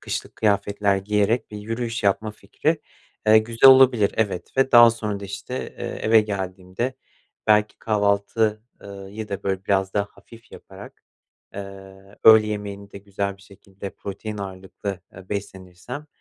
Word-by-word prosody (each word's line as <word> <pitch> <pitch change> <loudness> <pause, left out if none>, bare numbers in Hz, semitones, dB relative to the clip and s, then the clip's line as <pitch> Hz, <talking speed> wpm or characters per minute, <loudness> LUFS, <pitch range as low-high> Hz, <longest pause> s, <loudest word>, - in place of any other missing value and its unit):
kışlık - - -5
kıyafetler 100 -1 +1
giyerek 105 +4 0
bir 105 - -7
yürüyüş 115 +2 -4
yapma 105 +2 +1
fikri, 145 +10 -2 0.5
eee, 110 0 +7
güzel 115 +4 +6
olabilir, 130 -6 +5
evet. 100 +1 -2
Ve 135 0 +2
daha 120 -1 +9
sonra 105 -3 -4
da 100 - -7
işte, 100 +5 -7 0.2
eee, - - -4 0.2
eve 110 0 +5
geldiğimde 95 +3 -4 0.5
belki 105 0 +3
kahvaltı, 105 +1 0 0.2
ııı, 100 -1 -10
yı 110 +1 -7
da 100 -1 -5
böyle, 95 -1 -2
biraz 95 -1 0
daha 100 0 0
hafif 115 0 -18
yaparak, - - -13 0.5
ııı, 100 0 -11
öğle 110 -1 +8
yemeğini 100 -1 -6
de 100 - -9
güzel 100 0 -4
bir 100 - -20
şekilde 100 0 -11
protein 105 +2 -7
ağırlıklı, 95 0 -6
eee, 95 -1 -14
beslenirsem, 100 +7 -7
100 Hz, 150 wpm, -23 LUFS, 100-110 Hz, 0.5 s, daha